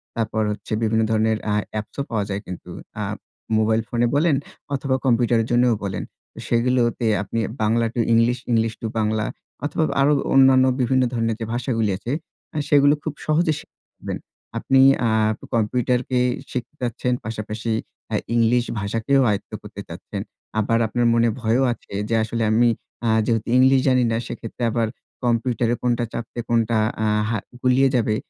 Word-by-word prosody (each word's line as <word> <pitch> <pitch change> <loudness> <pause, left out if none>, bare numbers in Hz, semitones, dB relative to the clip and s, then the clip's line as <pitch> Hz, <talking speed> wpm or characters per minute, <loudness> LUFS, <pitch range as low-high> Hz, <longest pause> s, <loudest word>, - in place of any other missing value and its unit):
তারপর 110 -1 -1
হচ্ছে 105 - -6
বিভিন্ন 110 0 +2
ধরনের 110 0 +2
আ - - +2 0.2
অ্যাপ্সও 110 +6 -4
পাওয়া 110 -3 0
যায় 100 0 -2
কিন্তু। 90 - -8 0.3
আ - - -1 0.5
মোবাইল 110 +1 +2
ফোনে 120 0 +1
বলেন 155 0 +3 0.4
অথবা, 135 -1 0
কম্পিউটারের 120 -2 +3
জন্যও 120 -1 +4
বলেন। 95 -2 -3 0.4
সেগুলোও 120 0 +2
তে 115 - +1 0.2
আপনি 115 +3 -3 0.2
Bangla 115 +2 +2
to 120 - -1
English, 115 +2 +3
English 115 -1 +2
to 115 - -2
Bangla 110 0 0 0.4
অথবা, 155 +2 0 0.2
আরো 145 +2 +4 0.2
অন্যান্য 130 -1 +6 0.2
বিভিন্ন 130 +1 +3
ধরনের 115 -1 0
যে 115 - -3
ভাষাগুলি 115 -3 0
আছে, 115 +5 -5 0.4
আ - - -2
সেগুলো 145 -1 +6
খুব 155 - -3
সহজে 155 +1 +2
শিখবেন। - - -9 0.4
আপনি 135 0 +3 0.3
আ - - +2 0.5
কম্পিউটারকে 125 +3 +1 0.3
শিখতে 125 +3 -5
চাচ্ছেন। 125 +1 -1
পাশাপাশি 110 0 -4 0.4
আ - - +2 0.2
ইংলিশ 120 +1 +3 0.2
ভাষাকেও 115 +7 +1
আয়ত্ত 100 -2 -2
করতে - - -9
চাচ্ছেন। - - -6 0.4
আবার 115 +2 +2
আপনার 120 +2 0
মনে 115 0 +3
ভয়ও 115 +3 +2
আছে, 115 - -15 0.2
যে, 115 - +2
"আসলে 115 +1 -2
আমি 120 +2 +4 0.4
আ - - +3 0.2
যেহেতু 115 -2 0
ইংলিশ 130 +1 +6
জানি 130 -1 +4
না, 115 - +1
সেক্ষেত্রে 115 +1 -6
আবার 115 -1 +1 0.4
কম্পিউটারে 120 0 +1
কোনটা 120 -1 +1
চাপতে 120 +1 -5
কোনটা 115 -1 +2 0.3
আ - - +1 0.2
হা 115 - 0 0.2
গুলিয়ে 130 +1 +4
যাবে," 110 -3 +2
115 Hz, 155 wpm, -22 LUFS, 110-125 Hz, 0.5 s, অন্যান্য